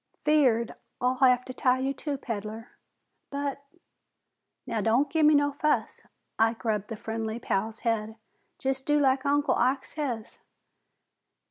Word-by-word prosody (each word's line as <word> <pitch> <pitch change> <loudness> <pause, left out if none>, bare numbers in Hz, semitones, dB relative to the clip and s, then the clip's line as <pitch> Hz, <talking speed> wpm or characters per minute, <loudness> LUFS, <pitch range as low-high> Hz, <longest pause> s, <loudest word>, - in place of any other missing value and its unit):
"'Feard 255 -7 +3 0.3
I'll 255 0 +1
have 250 -1 +4
to 255 - -7
tie 255 0 +2
you 265 +1 -1
too, 285 +1 -4
peddler." 225 -2 -6 0.6
"But 280 0 -3 0.5
" - - -55
"Now 230 -4 -2
don't 240 +7 +2
gimme 305 -1 +5
no 285 0 +3
fuss." 300 +2 -1 0.3
Ike 225 +2 +1
rubbed 210 -2 0
the 225 - -5
friendly 220 +1 -4
Pal's 220 -1 -2
head. 220 -2 -1 0.4
"Jest 265 0 -2
do 295 0 +4
like 270 -1 +2
Uncle 290 +1 +2
Ike 260 +2 +1
says." 245 -8 -5
255 Hz, 140 wpm, -28 LUFS, 225-280 Hz, 0.6 s, gimme